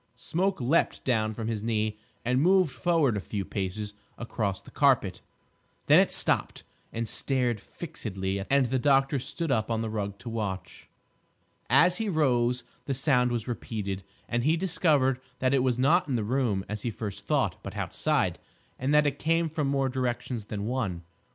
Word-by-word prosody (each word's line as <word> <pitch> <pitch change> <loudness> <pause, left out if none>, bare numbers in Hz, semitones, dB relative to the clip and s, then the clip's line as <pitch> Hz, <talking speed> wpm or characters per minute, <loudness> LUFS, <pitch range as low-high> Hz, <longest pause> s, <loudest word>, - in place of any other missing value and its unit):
Smoke 185 +9 -1
leaped 135 +7 +1
down 110 -4 +1
from 110 0 -4
his 110 -2 -2
knee 110 -1 -1 0.3
and 125 +2 +2
moved 185 -1 +4
forward 160 -5 +2
a - - -1
few 100 0 -4
paces 100 +2 -4 0.2
across 110 -5 -2
the - - -15
carpet. - - +2 0.6
Then - - +7
it - - +3
stopped - - 0 0.3
and 115 0 -3
stared 125 -2 0
fixedly; 100 - -4
and 140 -1 +4
the 130 +2 0
doctor 135 +1 +3
stood 160 +4 -3
up 110 -3 +1
on 115 -1 0
the 110 - -3
rug 100 -2 -3
to - - -12
watch. 105 -5 -4 0.8
As 180 +1 +5
he 225 -2 -1
rose 125 -7 +2 0.2
the 135 - -1
sound 125 -3 +3
was 120 -1 -2
repeated, 105 -5 -4 0.3
and 120 0 0
he 155 +4 +3
discovered 155 -8 +2 0.2
that 130 +1 +1
it 135 - +4
was 125 -2 +1
not 150 +7 +3
in 135 - 0
the 115 - 0
room 110 -4 0
as 105 0 -4
he 120 - -2
first 105 -2 -6
thought, - - +1
but - - -7
outside, - - 0 0.4
and 135 +4 +1
that 150 0 +5
it 145 -1 0
came 165 +1 +2
from 150 -2 -1
more 135 -1 +1
directions 125 -3 -2
than 105 -1 -4
one. 105 -8 -2
125 Hz, 175 wpm, -28 LUFS, 110-140 Hz, 0.8 s, Then